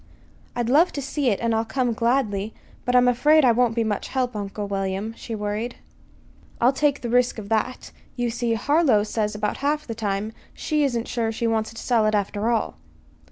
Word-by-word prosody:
"I'd 240 -1 -1
love 305 +8 +4
to - - -3
see 275 -1 0
it, 200 - 0
and 230 -1 +1
I'll 225 0 +1
come 240 +1 -1
gladly; 225 -3 0 0.3
but 250 - +1
I'm 250 0 +6
afraid 295 +5 +4
I 245 - +6
won't 235 -1 +2
be 230 - +1
much 210 -2 -2
help, 255 -3 -2
Uncle 205 0 -4
William," 195 +2 -2
she 230 - -6
worried. 210 +3 -3 0.8
"I'll 245 +3 +4
take 285 0 +1
the 240 - -4
risk 245 0 +2
of 205 -2 -7
that. 225 +3 -1 0.2
You 245 -1 -1
see, 235 0 -1
Harlow 275 -3 +3
says 210 0 -2
that - - -6
about 210 0 -2
half 295 +2 -1
the 230 - -5
time 215 -1 -3 0.2
she 305 -1 0
isn't 240 -4 -1
sure 230 -2 -1
she 225 +1 -3
wants 220 -1 0
to - - -7
sell 230 -4 +2
it, 215 - +2
after 205 +2 -1
all." 230 -2 -1
230 Hz, 205 wpm, -24 LUFS, 215-250 Hz, 0.8 s, I'm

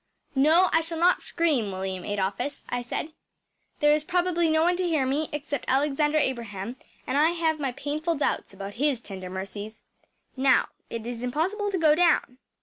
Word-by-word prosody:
“No, 315 +7 +5
I 325 - +5
shall 330 0 -4
not 350 +2 +4
scream, 290 - 0
William 190 -1 -4
Adolphus,‚ÄĚ 205 +8 -2
I 245 - -1
said. 280 +6 -4 0.7
“There 295 0 +6
is 300 0 +1
probably 350 -1 +1
no 315 0 +3
one 355 +1 +3
to 370 - 0
hear 310 -6 +1
me 290 +4 -1
except 290 -2 -4
Alexander 295 +3 +2
Abraham, 235 -5 -2 0.3
and 275 - 0
I 310 +2 +5
have 320 -2 0
my 275 -3 -1
painful 300 +6 -2
doubts 290 - -1
about 195 +1 -7
his 290 -5 +2
tender 190 -5 -8
mercies. 200 +3 -7 0.5
Now, 265 0 +3 0.2
it 230 -1 -5
is 240 -1 -5
impossible 340 - -1
to 390 - -1
go 315 -3 +5
down. 310 -6 +2
285 Hz, 175 wpm, -26 LUFS, 235-320 Hz, 0.7 s, There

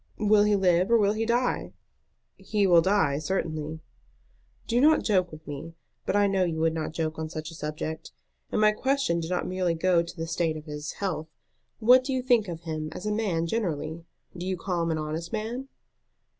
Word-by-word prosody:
"Will 210 -1 +4
he 210 0 +3
live 185 -1 +3
or 235 - +6
will 205 -1 +3
he 220 +1 -2
die?" 240 +2 0 0.6
"He 210 -2 0
will 175 -3 +6
die, 165 -7 +2
certainly." 155 -3 -3 0.8
"Do 240 +2 +1
not 310 +2 +5
joke 185 -5 +2
with 155 0 -11
me. 150 +3 -7 0.3
But - - +1
I 205 0 +4
know 195 -1 +2
you 165 -3 -1
would 160 0 +2
not 160 -1 -3
joke 160 0 -3
on 160 0 -3
such 155 0 -6
a - - -10
subject. 155 0 -5 0.4
And - - 0
my 215 0 +6
question 265 -6 0
did 165 0 -4
not 180 - -1
merely 180 -2 0
go 175 +1 +3
to 170 +1 -8
the 165 - -3
state 165 -1 -1
of 155 - -10
his 150 -1 -6
health. 175 -6 -3 0.5
What 250 +3 +6
do 265 +1 -2
you 255 -1 -1
think 240 -5 +3
of 170 -2 -6
him 155 -2 -4
as 180 - -7
a 210 - 0
man 200 -7 0
generally? 165 -5 -2 0.3
Do 180 +1 -5
you 190 -1 -1
call 175 0 -2
him 165 - 0
an 160 - 0
honest 155 +2 -4
man?" 230 +5 -3
175 Hz, 210 wpm, -27 LUFS, 160-210 Hz, 0.8 s, or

